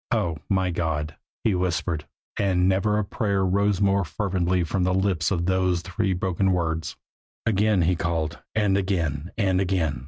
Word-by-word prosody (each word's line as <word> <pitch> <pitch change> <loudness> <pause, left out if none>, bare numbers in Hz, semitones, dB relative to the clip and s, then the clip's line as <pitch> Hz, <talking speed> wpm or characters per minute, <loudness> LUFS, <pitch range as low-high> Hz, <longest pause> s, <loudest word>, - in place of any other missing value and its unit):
"Oh, 90 -9 0
my 95 -2 +1
God!" 80 -3 -2 0.3
he 110 - +2
whispered 90 -4 -1 0.3
and 95 -2 +2
never 100 +3 +2
a 105 - 0
prayer 100 -1 0
rose 100 +1 +2
more 100 -1 +3
fervently 90 +1 0
from 90 +2 -1
lips 90 -2 +1
than 85 -3 0
those 95 -1 +1
three 95 +1 -1
broken 95 0 +1
words. 80 -2 -1 0.5
Again 105 -3 +2
he 90 +2 +2
called, 80 -1 -2 0.2
and 105 -3 +2
again, 85 -5 -1
and 95 -3 +2
again. 85 -8 0
95 Hz, 155 wpm, -25 LUFS, 85-100 Hz, 0.5 s, more